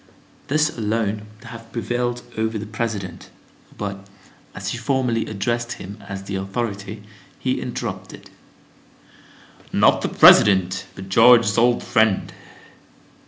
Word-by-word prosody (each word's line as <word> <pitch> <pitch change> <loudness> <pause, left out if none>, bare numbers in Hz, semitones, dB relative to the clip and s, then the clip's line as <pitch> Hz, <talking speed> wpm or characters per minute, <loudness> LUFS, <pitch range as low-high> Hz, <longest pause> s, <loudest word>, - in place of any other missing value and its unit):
This 155 +2 +1
alone 105 -1 -2
would 115 +2 -14
have 115 -1 -11
prevailed 120 +1 -2
over 110 0 -1
the 105 - -5
President, 110 -3 -5 0.5
but, 100 -1 -6 0.5
as - - -4
she - - -4
formally 130 -5 0
addressed 120 +3 -2
him 100 +4 -10
as 95 -1 -6
the 100 0 -4
authority, 100 +1 -4 0.3
he - - -2
interrupted: - - -6 1.4
"Not - - +4
the - - -1
President, 95 -2 +5
but 95 0 -9
George's 115 0 +6
old 120 +1 +3
friend!" 110 -4 +1
110 Hz, 120 wpm, -21 LUFS, 100-120 Hz, 1.4 s, George's